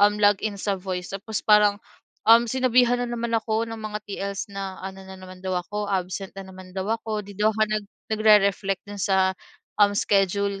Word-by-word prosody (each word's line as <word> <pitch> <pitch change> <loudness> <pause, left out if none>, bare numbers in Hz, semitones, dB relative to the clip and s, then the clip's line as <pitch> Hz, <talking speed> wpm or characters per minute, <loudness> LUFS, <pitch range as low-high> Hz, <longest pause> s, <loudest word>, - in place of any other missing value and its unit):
um, 205 +1 +5
log 205 -1 +5
in 210 -2 -2
sa 200 -1 -1
voice, 180 -1 -4
tapos 215 +2 -4
parang, 210 -1 +5 0.5
um, 230 +1 +8
sinabihan 250 -1 +3
na 245 - -2
naman 235 -1 -3
ako 220 0 0
ng 225 - -6
mga 215 0 -4
TL's 200 0 -4
na, 195 -1 -5
ano 190 0 -7
na 190 - -10
naman 185 0 -12
daw 185 -1 -2
ako 205 +3 -5
absent 190 0 -3
na 195 - -6
naman 185 0 -12
daw 190 - -2
ako, 220 -2 -2
'di 200 - -10
daw 210 +1 +4
ako 220 0 0
nag 215 -1 -1 0.3
nagre-reflect 200 -2 +3
do'n 205 -1 -7
sa, 190 -1 +2 0.5
um, 205 0 +6
schedule 200 0 +1
205 Hz, 200 wpm, -24 LUFS, 195-215 Hz, 0.5 s, um